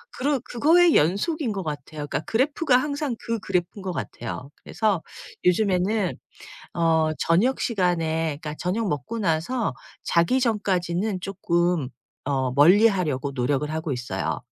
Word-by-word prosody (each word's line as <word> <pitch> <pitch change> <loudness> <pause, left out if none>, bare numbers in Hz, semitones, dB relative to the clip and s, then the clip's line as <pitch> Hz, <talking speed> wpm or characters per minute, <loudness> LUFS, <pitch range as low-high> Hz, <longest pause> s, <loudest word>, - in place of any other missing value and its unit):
그러 280 +1 0
그거의 325 +8 +4
연속인 225 - +1
것 195 -2 -3
같아요. 150 -1 -5
그러니까 140 - -1
그래프가 265 +3 +2
항상 285 -1 -2
그 230 -1 -3
그래프인 180 +1 -2
것 185 -1 -4
같아요. 125 -2 -6
그래서 210 -6 0 0.4
요즘에는 190 +1 +2 0.6
어 160 -2 +2
저녁 210 +11 +2
시간에 165 -7 0
그러니까 155 -2 -5
저녁 205 +5 -1
먹고 145 - -3
나서 200 - 0 0.3
자기 170 +10 +2
전까지는 200 -4 0
쪼끔 175 -5 0 0.4
어 130 -2 0
멀리하려고 160 - +4
노력을 135 +2 0
하고 160 -1 -3
있어요. 125 -1 -3
180 Hz, 315 characters per minute, -24 LUFS, 155-225 Hz, 0.6 s, 그거의